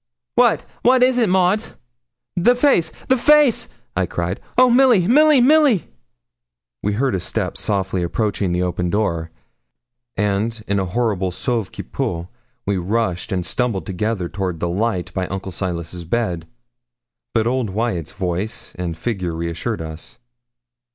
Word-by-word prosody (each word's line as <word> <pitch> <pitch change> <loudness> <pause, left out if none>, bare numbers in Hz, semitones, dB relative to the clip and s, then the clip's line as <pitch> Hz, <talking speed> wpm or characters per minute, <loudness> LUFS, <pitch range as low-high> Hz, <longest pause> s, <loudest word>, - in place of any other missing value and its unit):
'What - - +3 0.2
what 250 +1 +5
is 255 0 +3
it, 225 -5 +3
Maud?' 185 +3 +3 0.7
'The 240 +8 +4
face! 245 - +3 0.2
the 260 - +4
face!' 295 -2 +4 0.3
I - - +1
cried. - - -3 0.2
'Oh, 255 - +7
Milly! 245 -7 +5
Milly! 295 +2 +6
Milly!' 275 - +4 0.9
We 105 - 0
heard 130 +5 0
a 95 - 0
step - - -3
softly 95 -2 -1
approaching 100 +1 -1
the 90 +1 0
open 90 0 -1
door, 85 -5 -1 0.9
and, 105 +2 -1
in 100 0 +1
a 95 - 0
horrible 100 -2 0
sauve 115 +2 -2
qui - - -7
peut, 85 -1 -3 0.4
we 100 -1 0
rushed 95 0 -1
and 90 -2 -1
stumbled 115 -4 -1
together 95 0 -2
toward 90 -3 -3
the 85 - -1
light 95 0 -1
by 95 -1 -2
Uncle 95 0 -5
Silas's 85 -1 -4
bed. 85 -4 -2 0.9
But 110 -1 +3
old 125 -2 0
Wyat's 95 -6 -2
voice 95 +3 -3
and 85 -2 -3
figure 95 -4 -2
reassured 85 +5 -3
us. 80 +5 -8
100 Hz, 145 wpm, -20 LUFS, 90-135 Hz, 0.9 s, Oh